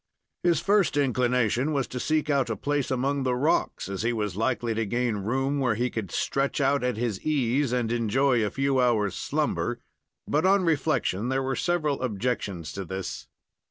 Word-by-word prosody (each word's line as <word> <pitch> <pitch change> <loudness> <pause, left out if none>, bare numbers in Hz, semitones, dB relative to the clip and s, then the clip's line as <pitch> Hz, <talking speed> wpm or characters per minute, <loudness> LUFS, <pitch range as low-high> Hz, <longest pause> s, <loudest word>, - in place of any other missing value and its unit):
His 170 -2 +3
first 200 -6 +2
inclination 125 0 +1
was 135 -3 +1
to 125 - -4
seek 155 +3 0
out 140 -5 +1
a 115 - -1
place 145 +5 -1
among 135 +2 0
the 130 -1 0
rocks, 145 +6 0
as 95 -1 -4
he 115 +2 +1
was 105 -5 -2
likely 115 +1 0
to 115 +1 -1
gain 120 0 0
room 135 +7 -1
where 125 -5 +1
he 120 +3 -1
could 110 -5 -4
stretch 135 +1 -1
out 140 -1 +2
at 125 -3 0
his 110 -5 -2
ease 140 -3 +1
and 120 -2 0
enjoy 120 +1 +2
a 105 - 0
few 135 +1 0
hours' 110 -5 +2
slumber, - - -1 0.5
but, 150 - +1
on 195 +1 +4
reflection, 140 - 0
there 135 0 0
were 135 0 -1
several 155 -5 0
objections 105 - -2
to 100 - -4
this. 95 +1 -6
125 Hz, 185 wpm, -26 LUFS, 115-140 Hz, 0.5 s, on